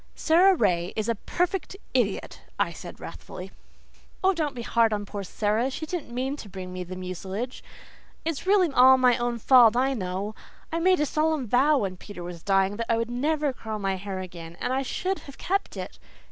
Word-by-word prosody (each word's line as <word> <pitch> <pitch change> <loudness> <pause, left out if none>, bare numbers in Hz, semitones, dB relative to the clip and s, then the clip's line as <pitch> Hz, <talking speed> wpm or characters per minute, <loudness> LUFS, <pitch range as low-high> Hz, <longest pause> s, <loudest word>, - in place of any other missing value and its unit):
"Sara 365 +4 +5
Ray 180 - +1
is 215 0 -1
a 230 - +2
perfect 355 - -2 0.2
idiot," - - -1 0.2
I - - +1
said - - -10
wrathfully - - -9 0.7
"Oh, 385 +1 +5
don't 305 -5 -2
be 240 - -5
hard 230 -1 +3
on 205 -1 -2
poor 200 0 -5
Sara. 215 +6 0
She 315 +4 -5
didn't 335 -3 -4
mean 260 +3 -2
to 210 - -9
bring 185 -1 -7
me 185 0 -4
mucilage. 185 +6 -5 0.6
It's 330 +2 -3
really 380 -5 +4
all 260 +1 +8
my 250 -2 +5
own 240 0 -1
fault, 235 -1 +6
I 265 +2 +2
know. 195 -1 -3 0.4
I 330 - 0
made 365 -1 +4
a - - +3
solemn 310 -2 0
vow 275 +7 +4
when 195 -6 -2
Peter 180 -2 -9
was 175 -1 -7
dying 195 +1 +2
that 230 0 -2
I 230 - +3
would 230 +1 -2
never 290 +3 0
curl 220 -3 -5
my 195 -2 -1
hair 190 0 -5
again, 170 -2 -9
and 250 - -1
I 265 - +1
should 370 +8 -2
have 280 - -12
kept 390 +2 -2
it. - - -7
240 Hz, 200 wpm, -26 LUFS, 195-295 Hz, 0.7 s, all